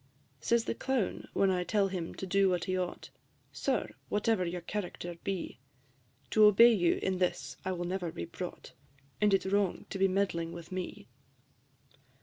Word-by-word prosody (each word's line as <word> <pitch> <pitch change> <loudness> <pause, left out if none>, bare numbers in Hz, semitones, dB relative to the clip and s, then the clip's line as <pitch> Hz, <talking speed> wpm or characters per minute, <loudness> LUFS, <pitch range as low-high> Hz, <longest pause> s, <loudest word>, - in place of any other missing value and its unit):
V. - - -17
Says 235 0 +3
the - - -1
Clown, 255 -3 -1
when 195 -1 +3
I 180 -1 +1
tell 200 +1 +2
him 180 -3 -4
to - - -5
do 195 +1 +3
what 180 -2 0
he 185 - -1
ought, 180 -1 -4 0.4
"Sir, - - -1 0.2
whatever 210 -1 +1
your 175 0 -3
character 175 -2 -4
be, 190 -9 -3 0.7
To 215 -1 +6
obey 230 +3 +8
you 175 -5 +2
in 185 -1 0
this 140 -7 -1
I 190 - -1
will 175 -1 -3
never 180 -1 -2
be 85 - -5
brought, - - -7 0.5
And 210 -1 +4
it 195 -1 +3
's 190 - -3
wrong 200 -3 +1
to 195 - -4
be 195 - +5
meddling 185 -4 0
with 170 +1 -9
me." 185 -1 -5
190 Hz, 180 wpm, -31 LUFS, 175-200 Hz, 0.7 s, obey